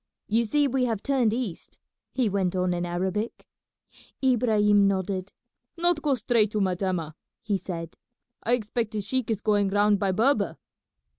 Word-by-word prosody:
You 230 +2 +1
see 290 +6 +2
we 260 -1 +1
have 225 -4 -2
turned 260 -6 +2
east," 225 -7 -5 0.3
he 255 -3 +1
went 190 -2 0
on 180 -1 +1
in 175 0 -2
Arabic. 190 +6 -3 0.8
Ibrahim 215 -5 +4
nodded. 190 0 -2 0.5
"Not 345 -2 +1
go 290 -3 +2
straight 230 -2 +2
to 215 - 0
Metemmeh," 185 -4 -1 0.3
he 205 -3 0
said. 165 -3 -6 0.5
"I 235 - 0
expect 230 -1 -1
the 210 - -1
sheik 240 +4 -2
is 215 -2 -1
going 205 -2 +2
round 205 0 +3
by 195 -1 +1
Berber." 235 +9 +1
210 Hz, 155 wpm, -26 LUFS, 190-240 Hz, 0.8 s, Ibrahim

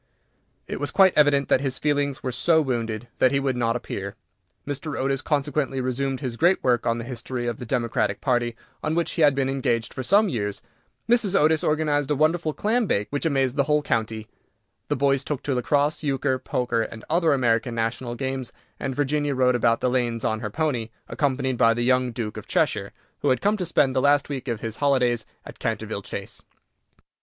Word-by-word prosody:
It - - -5
was 145 +1 -1
quite 190 +2 +5
evident 145 -2 +4
that - - +4
his 135 -2 -2
feelings 145 -2 0
were 130 - -1
so 160 +7 +3
wounded 120 -5 -2
that 130 - +5
he 140 - +2
would 135 -2 0
not 115 -1 0
appear. 100 -4 -5 0.5
Mr. 145 +1 -4
Otis 135 0 0
consequently 145 -2 -1
resumed 130 +1 -2
his 125 -4 -4
great 175 +6 +3
work 125 -2 +2
on 115 0 +1
the 115 - -4
history 125 0 -5
of 120 -2 -3
the 125 - -7
Democratic 120 -2 0
Party, 120 -3 0 0.3
on 155 +1 0
which 170 0 0
he 165 - -2
had 145 -3 +5
been 135 -1 +1
engaged 125 -4 -1
for - - -4
some 200 - +4
years; 105 - -2 0.5
Mrs. 230 -5 +3
Otis 155 +1 +3
organized 150 -2 +1
a 150 - +2
wonderful 155 +2 +1
clam 220 +7 0
bake, 105 - 0
which 145 +3 0
amazed 135 -3 0
the 140 - +3
whole 150 0 +2
county; 110 -3 -2 0.6
the - - 0
boys 140 0 +2
took 145 -1 -4
to 140 - -1
lacrosse 145 +4 +1
euchre, 135 -2 0
poker, 125 -3 -1
and 110 0 -6
other 165 0 +2
American 120 -3 +1
national 115 +2 -2
games, 130 -1 -3 0.3
and 130 - -3
Virginia 145 0 0
rode 130 -1 +3
about 115 -1 +2
the - - +2
lanes 120 -2 0
on 110 0 0
her 110 -1 -4
pony, 125 -3 -1 0.2
accompanied 130 -3 -1
by 115 0 +5
the 120 - -1
young 125 0 +2
Duke 115 -2 -5
of - - -8
Cheshire, - - 0 0.3
who - - +1
had 130 - +2
come 205 +1 +2
to 185 -4 -3
spend 135 -5 +2
the 130 - +3
last 145 +1 +3
week 135 -2 -5
of 115 -3 -3
his 110 -1 -5
holidays 125 -5 +1 0.2
at - - -11
Canterville - - -3
Chase. - - -6
130 Hz, 205 wpm, -24 LUFS, 120-145 Hz, 0.6 s, quite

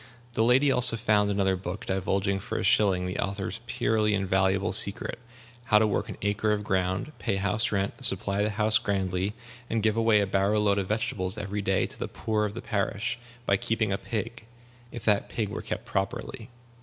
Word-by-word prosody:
The 110 - 0
lady 130 +4 +4
also 125 -2 +4
found 105 -2 +2
another 100 -1 +1
book, 90 +1 -6
divulging 95 +1 0
for - - -4
a - - -2
shilling 95 -4 +3
the 90 +1 -4
author's 100 +2 -3
purely 110 -4 +1
invaluable 95 0 +1
secret 100 +1 +2 0.5
how 105 -4 +5
to 110 - +4
work 105 - -1
an - - -7
acre 105 +1 +1
of 105 0 -2
ground, 95 +6 -1
pay - - -1
house 100 +3 0
rent, 100 +5 -2
supply 100 -2 0
the 105 - +1
house 105 +1 +3
grandly, 95 0 -1 0.4
and 110 -2 0
give 110 -1 +2
away 115 -2 +4
a 100 - +2
barrow 100 +2 +1
load 100 -1 +2
of 95 - -2
vegetables 100 -2 -2
every 100 0 -3
day 95 -1 +1
to - - -10
the - - -2
poor 110 -1 -1
of 105 +1 -5
the 115 - -6
parish, 105 +2 -2 0.3
by 100 - +3
keeping 110 -1 0
a - - 0
pig 110 +4 -4 0.5
if 120 - -8
that 105 -1 +2
pig 105 -1 -2
were 105 - -5
kept - - -5
properly. - - -3
105 Hz, 195 wpm, -27 LUFS, 95-110 Hz, 0.5 s, how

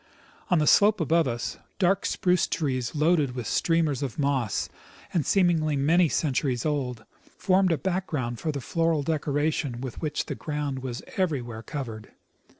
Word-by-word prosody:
On 180 - +4
the 155 - +2
slope 205 +6 +5
above 165 -1 +2
us, 120 -1 -3 0.2
dark 195 +1 +2
spruce 180 -1 +2
trees 130 -4 -2
loaded 150 -4 +2
with 125 -3 -4
streamers 160 -2 +1
of 135 -6 -4
moss, 135 -7 0 0.5
and 170 - +2
seemingly 165 -4 +2
many 160 +5 +3
centuries 130 -5 0
old, 130 -6 -2 0.3
formed 190 -1 +3
a 165 - +2
background 155 -11 -2
for 155 - -1
the 140 -2 -5
floral 165 0 0
decoration 145 -3 -1
with 130 -2 -6
which 150 -2 -2
the - - -4
ground 145 -3 -3
was 125 -2 -5
everywhere 130 - -1
covered. 115 -4 -7
150 Hz, 150 wpm, -26 LUFS, 130-165 Hz, 0.5 s, slope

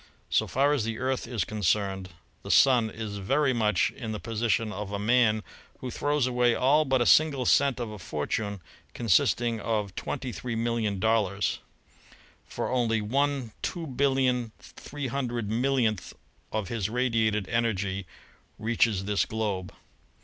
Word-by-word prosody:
So - - +2
far 140 +3 +2
as 140 -7 0
the 115 0 -3
Earth 130 -1 -2
is 115 -3 -1
concerned, 95 -2 -1 0.3
the - - -9
Sun 125 -5 +5
is 110 -2 -6
very 135 +7 +2
much 105 -6 +2
in 110 -4 -6
the 105 - -4
position 115 -1 -1
of 105 -1 -5
a 100 - -2
man 110 0 +3 0.3
who 125 - -6
throws 145 +1 0
away 125 -1 +2
all 145 +4 +3
but 130 -3 +2
a - - -4
single 145 -4 +4
cent 140 +1 +3
of 120 -3 -4
a 105 - -8
fortune 95 +5 -3 0.3
consisting 115 +2 +2
of 105 -3 -2
twenty 130 +4 -4
three 115 +4 -5
million 115 -3 -1
dollars; 105 -2 +1 0.9
for - - -3
only 115 -3 +1
V2800000000 130 - 0 2.0
°f 110 -3 -2
his 105 -2 -2
radiated 110 -4 +1
energy 100 -5 -1 0.5
reaches 110 -3 +1
this 105 0 +1
globe. 105 -4 -3
115 Hz, 135 wpm, -27 LUFS, 105-125 Hz, 2.0 s, Sun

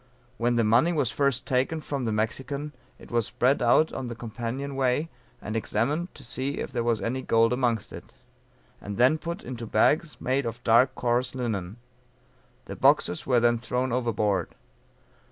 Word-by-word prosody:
When 120 +1 +1
the 115 - +3
money 115 +10 +4
was 145 -8 0
first 140 -3 0
taken 130 +5 0
from 140 -4 -4
the 110 - 0
Mexican, 135 +7 -3 0.2
it - - -15
was 115 -3 +1
spread 130 +3 +1
out 125 +6 +4
on 130 -2 -4
the 120 - -5
companion 120 +4 -5
way 135 +4 +1 0.3
and 110 -1 -6
examined 140 - -1
to - - -12
see 130 +4 -3
if - - -4
there 120 -2 -1
was 115 -4 0
any 125 +4 -2
gold 115 -1 +3
amongst 120 -4 -1
it; - - -11 0.7
and 100 0 -6
then 130 +6 +4
put 170 +2 -5
into 120 -2 -6
bags 150 +9 +2
made 130 0 0
of 115 +1 -6
dark 120 +3 +4
coarse 125 +1 0
linen; 110 -6 -3 0.9
the - - -7
boxes 90 - +2
were 125 -2 +4
then 120 0 +3
thrown 125 +2 -2
overboard. 110 -6 0
125 Hz, 170 wpm, -26 LUFS, 115-135 Hz, 0.9 s, money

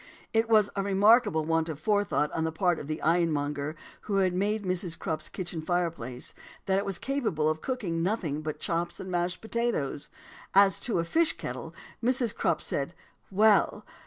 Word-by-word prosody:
"It 225 0 +2
was 215 -2 +5
a 200 - 0
remarkable 200 -3 +4
want 165 0 +1
of 155 - -4
forethought 205 -5 +1
on 160 - -1
the 160 - 0
part 175 +1 +1
of 140 - -7
the 155 0 -3
ironmonger 150 -3 +1 0.3
who 200 - +1
had 190 -2 +3
made 205 +3 0
Mrs. 180 -2 -1
Crupp's 155 -1 -3
kitchen 175 -4 -4
fireplace, 160 -8 -2 0.3
that 190 0 +2
it 200 - -3
was 195 -2 -1
capable 230 - -1
of 155 0 0
cooking 200 -11 -2
nothing 170 -6 -1
but 155 -1 -4
chops 170 +1 -2
and 185 - -6
mashed 175 +1 -1
potatoes. 220 - -2 0.5
As 195 -2 +6
to 235 - 0
a 165 - +1
fish 325 - +2
kettle, - - -7 0.3
Mrs. 245 -2 +1
Crupp - - 0
said - - -2 0.3
'Well! 210 +2 +3
180 Hz, 175 wpm, -28 LUFS, 160-210 Hz, 0.5 s, As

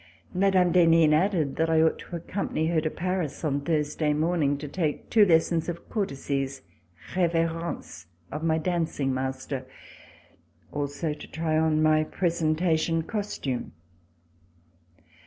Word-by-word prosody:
Mme. 185 -1 +3
d'Henin 165 -3 +5
added 160 -4 +1
that 160 0 +1
I 160 -1 +4
ought 160 - +2
to 175 - -8
accompany 170 -1 -2
her 165 -2 +2
to 155 - -1
Paris 175 -3 -3
on 140 -1 0
Thursday 150 0 0
morning 155 -2 +1
to 150 +1 -6
take 155 0 -3
two 220 -3 +6
lessons 165 -2 +3
In 175 - -2 0.2
courtesies 140 - -2 0.5
{reverences) 165 - -1 0.2
of 150 - -4
my 160 -1 +2
danc 170 -1 -1
ing 135 -2 +1
master; 130 0 -4 1.0
also 145 +2 -2
to 150 - -10
try 160 0 -2
on 155 -1 +2
my 155 0 +4
presentation 165 -1 0
costume. 200 - -4
160 Hz, 130 wpm, -27 LUFS, 150-170 Hz, 1.0 s, two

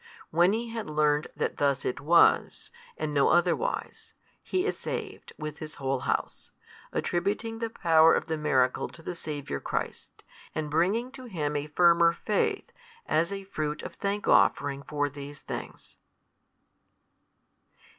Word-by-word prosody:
When 175 +3 +4
he 230 +1 -2
had 225 -2 -5
learnt 150 0 +2
that - - -2
thus 140 -2 +1
it 125 - -2
was, 170 +4 +3 0.3
and 150 -1 -3
no 140 -1 +4
otherwise, 180 - 0 0.3
he 370 +1 -1
is - - 0
saved - - -6
with 150 0 -6
his 155 -1 -7
whole 135 -1 -1
house, - - -3 0.4
attributing 210 +6 -1
the 230 -1 -2
power 165 -6 +5
of - - -1
the 160 -1 -2
miracle 130 -5 +1
to 165 - -14
the 180 - -4
Saviour 145 - -5
Christ, - - -5 0.3
and 155 -1 -3
bringing 200 +11 +1
to 260 -1 -10
Him 155 -9 -3
a 145 +1 -2
firmer 170 +1 +5
faith 445 - -1 0.3
as 165 +3 +1
a 195 0 -4
fruit 155 -5 -4
of - - -7
thank 200 +1 -3
offering 140 -1 +3
for 145 0 -1
these 145 0 -8
things. - - -8
160 Hz, 145 wpm, -28 LUFS, 145-200 Hz, 0.4 s, power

